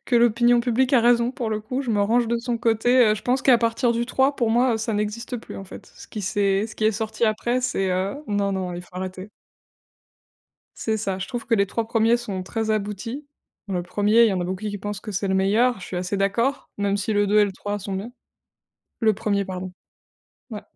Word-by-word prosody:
que 245 - -1
l'opinion 240 +1 +4
publique 250 +2 +1
a 250 - +6
raison 235 +1 +3
pour 245 -3 -4
le 215 0 -2
coup, 250 +5 -3
je 250 -4 -3
me 205 -2 +2
range 235 +3 +2
de 235 - +1
son 235 0 -2
côté, 235 +2 +2
heu, 215 - +4
je 215 - -8
pense 250 +1 +1
qu'à 255 -3 +5
partir 235 +1 +1
du 235 +1 -1
3 265 +3 +1
pour 235 -2 +1
moi, 240 +1 +3
heu, - - 0
ça 225 0 -2
n'existe 215 +4 -3
plus - - -10
en 195 - -7
fait. 195 +1 -11
Ce - - -12
qui 215 - -6
s'est 200 +1 +1
ce 220 - -11
qui 215 - -1
est 220 - +4
sorti 220 +2 -2
après, 240 +3 0
c'est 195 -6 0
heu, 190 +7 -1
non, 200 -1 0
non 185 -2 -3
il 175 - -6
faut 180 - -20
arrêter. 185 +2 -6 1.5
C'est 220 -1 -1
ça, 195 -3 -2
je 195 - -4
trouve 240 -2 -5
que 235 - +2
les 200 -2 +2
3 230 +3 -2
premiers 230 +1 +3
sont 200 -6 -5
très 220 +3 -2
aboutis. 215 +7 -4 0.4
Le 180 -3 -1
1er, 210 +5 +3
il - - +4
y - - 0
en 185 - -1
a - - -1
beaucoup 185 +3 -4
qui 205 - -4
pensent 205 0 -5
que 210 -1 -7
c'est 195 +1 -2
le 190 - +1
meilleur, 215 +5 +2
je - - -8
suis 185 - -5
assez 180 +3 -2
d'accord 235 +8 0
même 200 0 +1
si 205 +2 -2
le 205 -1 +2
2 210 +1 +4
et 210 - +6
le 200 - -3
3 205 +2 -4
sont 195 0 -6
bien. 200 +5 -5 0.9
Le 220 -3 +3
1er, 200 0 0
pardon. 185 -1 -6 0.8
Ouais, 215 -3 -6
215 Hz, 245 wpm, -23 LUFS, 200-235 Hz, 1.5 s, a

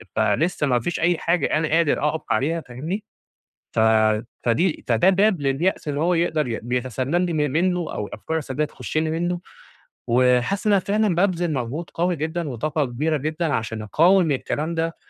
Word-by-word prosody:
فلسّه 145 - +1
ما 125 -2 +2
فيش 170 +9 -3
أي 175 0 +2
حاجة 170 +1 +1
أنا 155 0 +1
قادر 160 -2 +2
أقف 160 - -3
عليها 165 +4 +1
فاهمني، 155 - -5 0.7
ف - - +2 0.6
فدي 155 +8 +1
فده 120 +10 +4
باب 195 -3 +3
لليأس 145 +5 0
اللي 145 0 -2
هو 175 +3 +2
يقدر 160 -4 +1
ي 115 - -3
بيتسلل 130 +6 -1
لي 175 - -2
م 155 - -1
منه 180 +4 +1
أو 105 - -3
الأفكار 160 +12 -4
السلبية 150 0 -2
تخش 150 - -6
لي 155 0 +1
منه، 175 +2 -1 0.7
وحاسس 125 - +2
إن 210 - +4
أنا 195 - +4
فعلًا 210 -1 +1
بابذل 175 -2 +1
مجهود 135 +5 -4
قوي 175 0 0
جدًا 160 +1 -3
وطاقة 150 +5 -1
كبيرة 150 +5 -1
جدًا 155 +2 -2
عشان 110 -1 -3
أقاوم 170 - +3
الكلام 150 +4 -2
ده، 165 0 -2
160 Hz, 175 wpm, -23 LUFS, 130-175 Hz, 0.7 s, فده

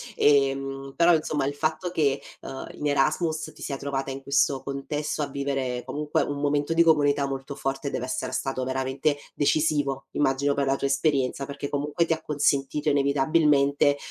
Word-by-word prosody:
ehm, 135 -1 +2
però, 170 +1 +5
insomma, 155 -3 0
il 140 - -1
fatto 155 +4 -1
che, 140 -5 +1 0.2
uhm, 135 - -7
in 150 - -2
Erasmus 155 +3 0
ti - - -16
sia 140 - -3
trovata 135 0 -3
in 135 0 -5
questo 140 -1 +1
contesto, 145 +2 -3
a 145 - -1
vivere, 135 -3 -2
comunque, 150 +3 -1
un 145 0 -2
momento 145 +2 +1
di 165 - +4
comunità 145 -3 +3
molto 135 +1 -5
forte, 135 +1 -3
dev'essere 130 +1 -3
stato 130 0 -2
veramente 130 +3 -1 0.2
decisivo, 145 -2 +1
immagino, 140 0 +1
per 140 0 0
la 135 0 +2
tua 140 - -1
esperienza, 140 -1 +1
perché, 140 0 -5
comunque, 145 +3 0
ti 165 - +1
ha 160 - -5
consentito, 145 0 0
inevitabilmente, 140 0 +3
140 Hz, 165 wpm, -26 LUFS, 135-150 Hz, 0.2 s, però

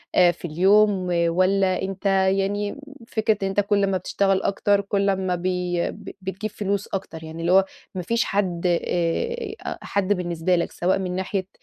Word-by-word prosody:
آآ 175 -1 +6
في 175 - -10
اليوم، 190 +3 +3 0.2
والّا 185 +2 +2
أنت 190 +1 -5
يعني 195 +1 +2
م - - -10 0.3
فكرة 220 -2 +1
إن - - +1
أنت 195 +1 0
كل 200 0 +2
ما 190 -1 +1
بتشتغل 195 0 +1
أكتر 200 0 +2
كل 200 0 0
أمّا 190 -2 0
بي 180 -1 -1
ب - - -10
بتجيب 195 +3 -4
فلوس 200 -1 -2
أكتر، 170 -4 -5
يعني 160 +1 -7
اللي 170 +2 +1
هو 190 +1 +6 0.3
ما 180 - -2
فيش 230 +6 +1
حد 185 -4 -1 0.2
آآ 430 - -1 0.3
حد 200 0 0
بالنسبة 175 -1 0
لك 170 - -1
سواء 185 +2 0
من 180 -1 -3
ناحية 190 0 -2
190 Hz, 175 wpm, -23 LUFS, 180-200 Hz, 0.3 s, آآ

